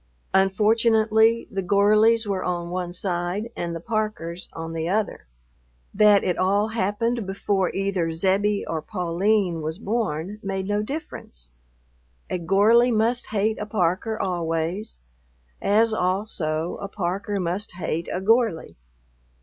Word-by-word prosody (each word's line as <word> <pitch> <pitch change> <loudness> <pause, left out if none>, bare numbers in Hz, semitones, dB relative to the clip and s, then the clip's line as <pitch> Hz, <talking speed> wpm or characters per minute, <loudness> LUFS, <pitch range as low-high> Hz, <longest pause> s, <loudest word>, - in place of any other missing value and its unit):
Unfortunately 220 +3 +3
the 195 - -2
Gorleys 215 +4 +4
were 195 -2 -2
on 175 -1 -3
one 180 -1 -3
side 180 +4 -3
and 170 -1 -3
the - - -4
Parkers 195 -4 -3
on 165 0 -6
the 165 +1 -2
other. 210 - -1 0.7
That 205 0 +5
it 180 -2 -1
all 200 +3 +2
happened 225 +1 -1
before 195 -1 0
either 190 -4 -1
Zebbie 195 +5 +1
or 160 -1 -2
Pauline 180 0 0
was 160 +2 -4
born 205 -3 -2
made 195 -1 -3
no 205 0 0
difference. 215 - -7 0.8
A 180 - -1
Gorley 205 +8 +4
must 235 +2 +1
hate 215 +1 0
a 210 - -4
Parker 205 +2 0
always, 170 +3 -2 0.6
as 220 +2 +3
also 180 -5 -1
a 200 - -4
Parker 200 +1 -3
must 180 +4 -3
hate 170 -1 -3
a - - -1
Gorley. 220 - +1
195 Hz, 130 wpm, -24 LUFS, 175-215 Hz, 0.8 s, That